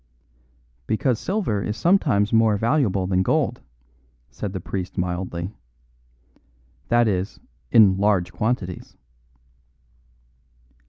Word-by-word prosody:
"Because 115 Hz, +1 st, 0 dB
silver 185 Hz, -, -1 dB
is 105 Hz, +2 st, -3 dB
sometimes 130 Hz, -, +2 dB
more 110 Hz, -2 st, +4 dB
valuable 110 Hz, -5 st, +1 dB
than 90 Hz, 0 st, +1 dB
gold," 95 Hz, -, 0 dB, 0.7 s
said 105 Hz, -, -5 dB
the 95 Hz, -, -4 dB
priest 95 Hz, +2 st, -5 dB
mildly; 90 Hz, +1 st, -3 dB, 1.3 s
"that 120 Hz, -1 st, +3 dB
is, 95 Hz, -1 st, -2 dB, 0.3 s
in 100 Hz, -4 st, +6 dB
large 100 Hz, -3 st, +1 dB
quantities." 105 Hz, -6 st, -3 dB
100 Hz, 95 wpm, -23 LUFS, 95-115 Hz, 1.3 s, in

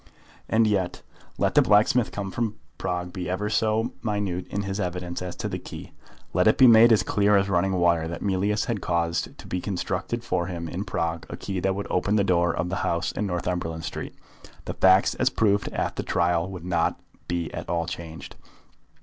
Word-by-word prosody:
And 110 Hz, 0 st, +4 dB
yet, 100 Hz, -4 st, 0 dB, 0.3 s
let -, -, +1 dB
the -, -, +6 dB
blacksmith 110 Hz, +3 st, +4 dB
from 105 Hz, +2 st, -2 dB, 0.2 s
Prague 90 Hz, 0 st, -3 dB
be 90 Hz, -2 st, -4 dB
ever 105 Hz, +3 st, -2 dB
so 110 Hz, +2 st, +1 dB
minute 100 Hz, -5 st, -2 dB
in 100 Hz, -, -3 dB
his 100 Hz, +1 st, -3 dB
evidence 90 Hz, -2 st, -3 dB
as 90 Hz, -1 st, -5 dB
to -, -, -4 dB
the -, -, -4 dB
key, -, -, -9 dB, 0.4 s
let 90 Hz, +3 st, +3 dB
it 110 Hz, -, +5 dB
be 130 Hz, -, +7 dB
made 115 Hz, 0 st, +8 dB
as 105 Hz, -4 st, +5 dB
clear 105 Hz, +1 st, +3 dB
as 100 Hz, 0 st, +1 dB
running 95 Hz, +1 st, +2 dB
water 85 Hz, -3 st, +2 dB
that 85 Hz, -, -5 dB
Mealyus 100 Hz, +2 st, +1 dB
had 115 Hz, -5 st, -2 dB
caused 85 Hz, -1 st, -1 dB
to -, -, -12 dB
be 90 Hz, -, -3 dB
constructed 95 Hz, +4 st, -3 dB
for 90 Hz, -6 st, -1 dB
him 85 Hz, -2 st, -5 dB
in 95 Hz, +5 st, -4 dB
Prague 85 Hz, -3 st, -2 dB
a -, -, -6 dB
key 95 Hz, -2 st, -4 dB
that 95 Hz, +1 st, 0 dB
would 100 Hz, -, -3 dB
open 100 Hz, +3 st, +1 dB
the 105 Hz, -, +3 dB
door 85 Hz, -2 st, +2 dB
of 85 Hz, +2 st, -2 dB
the 95 Hz, -, -2 dB
house 85 Hz, 0 st, -1 dB
in 105 Hz, -, -2 dB
Northumberland 90 Hz, -2 st, -3 dB
Street, -, -, -6 dB, 0.5 s
the -, -, -4 dB
facts 95 Hz, +1 st, +5 dB
as -, -, +2 dB
proved 105 Hz, -2 st, +1 dB
at -, -, -3 dB
the -, -, 0 dB
trial 85 Hz, +1 st, +1 dB
would 90 Hz, -3 st, -8 dB
not 85 Hz, -2 st, 0 dB, 0.3 s
be 85 Hz, -2 st, -2 dB
at -, -, -6 dB
all 85 Hz, -1 st, 0 dB
changed. 85 Hz, -1 st, -7 dB
95 Hz, 200 wpm, -25 LUFS, 85-105 Hz, 0.5 s, made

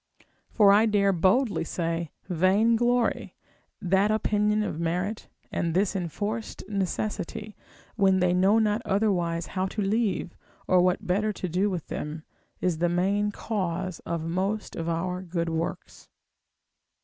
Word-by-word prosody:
For 205 Hz, -3 st, +5 dB
I 215 Hz, +3 st, +5 dB
dare 200 Hz, -2 st, +3 dB
boldly 200 Hz, +6 st, +2 dB
say, 165 Hz, -1 st, -2 dB, 0.2 s
vainglory, 225 Hz, +7 st, +2 dB, 0.4 s
that 190 Hz, +2 st, +2 dB
opinion 210 Hz, 0 st, +1 dB
of 180 Hz, -6 st, -4 dB
merit, 180 Hz, +6 st, -2 dB, 0.2 s
and 170 Hz, -1 st, -1 dB
this 200 Hz, +2 st, +1 dB
enforced 205 Hz, +5 st, -4 dB
necessity, 210 Hz, +2 st, -3 dB, 0.4 s
when 190 Hz, -2 st, +4 dB
they 180 Hz, -1 st, +3 dB
know 190 Hz, +4 st, +4 dB
not 215 Hz, 0 st, +2 dB
otherwise 180 Hz, -5 st, 0 dB
how 185 Hz, 0 st, 0 dB
to 210 Hz, +2 st, -4 dB
leave, 205 Hz, -3 st, 0 dB, 0.3 s
or 185 Hz, -1 st, +4 dB
what 180 Hz, 0 st, +1 dB
better 205 Hz, +4 st, +1 dB
to 185 Hz, -, -4 dB
do 185 Hz, +5 st, +1 dB
with 180 Hz, -5 st, -4 dB
them, 155 Hz, +1 st, -5 dB, 0.4 s
is 175 Hz, -3 st, 0 dB
the 175 Hz, 0 st, +2 dB
main 195 Hz, +4 st, +1 dB
cause 185 Hz, -4 st, -3 dB
of 170 Hz, -1 st, -4 dB
most 190 Hz, +5 st, -2 dB
of 165 Hz, 0 st, -3 dB
our 180 Hz, +2 st, -2 dB
good 170 Hz, -2 st, -2 dB
works. 165 Hz, +1 st, -5 dB
190 Hz, 135 wpm, -27 LUFS, 175-210 Hz, 0.4 s, For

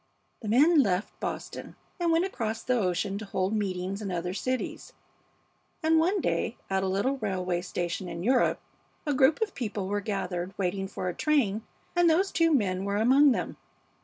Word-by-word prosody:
"The 220 Hz, -, -6 dB
men 290 Hz, +8 st, +5 dB
left 195 Hz, -3 st, -1 dB
Boston -, -, -5 dB, 0.2 s
and 340 Hz, -1 st, +2 dB
went 330 Hz, +2 st, +3 dB
across 225 Hz, -, -3 dB
the 255 Hz, -, +1 dB
ocean 195 Hz, -2 st, 0 dB
to 215 Hz, -, -6 dB
hold 190 Hz, 0 st, -1 dB
meetings 195 Hz, -1 st, -2 dB
in 200 Hz, -3 st, -4 dB
other 180 Hz, 0 st, -2 dB
cities, 255 Hz, +5 st, -3 dB, 0.9 s
and 320 Hz, 0 st, +4 dB
one 370 Hz, +5 st, +2 dB
day -, -, -1 dB
at 190 Hz, 0 st, +2 dB
a 190 Hz, -, -1 dB
little 200 Hz, +9 st, 0 dB
railway 185 Hz, -5 st, -1 dB
station 175 Hz, 0 st, -3 dB
in 170 Hz, 0 st, -5 dB
Europe 250 Hz, +4 st, +3 dB, 0.5 s
a 295 Hz, -, +1 dB
group 275 Hz, -, +4 dB
of 420 Hz, -, -5 dB
people 210 Hz, -5 st, -3 dB
were 205 Hz, +1 st, -1 dB
gathered, 190 Hz, -3 st, -3 dB
waiting 195 Hz, 0 st, -1 dB
for 185 Hz, -, -5 dB
a 180 Hz, -, -1 dB
train, 230 Hz, -, +1 dB, 0.3 s
and 350 Hz, -1 st, +5 dB
those 375 Hz, +5 st, +2 dB
two 330 Hz, -1 st, +3 dB
men 195 Hz, -9 st, +1 dB
were 200 Hz, 0 st, -1 dB
among 265 Hz, +6 st, +5 dB
them. -, -, -2 dB
210 Hz, 180 wpm, -28 LUFS, 185-275 Hz, 0.9 s, men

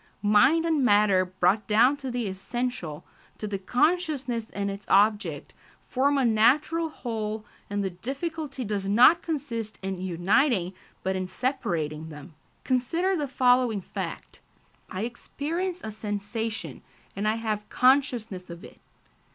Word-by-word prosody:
Mind 215 Hz, +11 st, +5 dB
and 315 Hz, -4 st, +2 dB
matter 205 Hz, -4 st, +4 dB
brought 185 Hz, +3 st, +1 dB
down 235 Hz, +6 st, +5 dB
to 270 Hz, -2 st, -5 dB
the 245 Hz, -2 st, -2 dB
essential, 190 Hz, -5 st, -4 dB, 0.3 s
to -, -, -5 dB
the 200 Hz, -2 st, -3 dB
consciousness 270 Hz, -, 0 dB
and 200 Hz, 0 st, -3 dB
its 200 Hz, +1 st, -7 dB
object, 210 Hz, +2 st, +2 dB, 0.3 s
form 280 Hz, +2 st, +1 dB
a 270 Hz, -, +2 dB
natural 295 Hz, +9 st, +3 dB
whole, 220 Hz, -6 st, -4 dB, 0.2 s
and 205 Hz, 0 st, -1 dB
the 190 Hz, -, -2 dB
difficulty 275 Hz, -, -4 dB
does 200 Hz, -2 st, -2 dB
not 250 Hz, +11 st, +6 dB
consist 235 Hz, -9 st, -4 dB
in 190 Hz, -1 st, -3 dB
uniting 190 Hz, -, +1 dB, 0.3 s
but 190 Hz, 0 st, 0 dB
in 185 Hz, 0 st, -2 dB
separating 160 Hz, -, -2 dB
them. 150 Hz, +2 st, -11 dB, 0.3 s
Consider 330 Hz, +10 st, +1 dB
the 295 Hz, -4 st, -1 dB
following 250 Hz, -4 st, +3 dB
fact: 185 Hz, -, -7 dB, 0.5 s
"I 185 Hz, -, -4 dB
experience 330 Hz, +9 st, -4 dB
a 220 Hz, -, -4 dB
sensation, 215 Hz, +1 st, -4 dB, 0.3 s
and 205 Hz, +2 st, -1 dB
I 215 Hz, -, +2 dB
have 215 Hz, -2 st, -3 dB
consciousness 245 Hz, -8 st, +2 dB
of 170 Hz, 0 st, -9 dB
it." -, -, -13 dB
225 Hz, 135 wpm, -26 LUFS, 200-270 Hz, 0.5 s, not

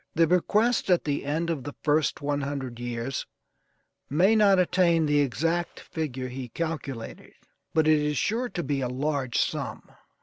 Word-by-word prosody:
The 165 Hz, +1 st, +5 dB
bequest 210 Hz, +8 st, +2 dB
at 180 Hz, -2 st, +4 dB
the 145 Hz, -1 st, -1 dB
end 160 Hz, +4 st, -1 dB
of 145 Hz, -6 st, -3 dB
the 145 Hz, -, -7 dB
first 150 Hz, -1 st, +1 dB
one 145 Hz, 0 st, 0 dB
hundred 135 Hz, -4 st, -4 dB
years 120 Hz, +2 st, -4 dB, 0.8 s
may 185 Hz, +10 st, +4 dB
not 205 Hz, -3 st, +5 dB
attain 175 Hz, -2 st, +3 dB
the 150 Hz, -1 st, +3 dB
exact 165 Hz, +5 st, 0 dB
figure 135 Hz, -5 st, -4 dB
he 125 Hz, 0 st, -6 dB
calculated, 145 Hz, -6 st, -5 dB, 0.4 s
but 160 Hz, -1 st, +4 dB
it 155 Hz, -1 st, +5 dB
is 150 Hz, -1 st, -1 dB
sure 240 Hz, +3 st, 0 dB
to 175 Hz, -, -4 dB
be 140 Hz, 0 st, -1 dB
a 125 Hz, -, 0 dB
large 135 Hz, -1 st, -1 dB
sum. -, -, -3 dB
150 Hz, 165 wpm, -27 LUFS, 135-170 Hz, 0.8 s, The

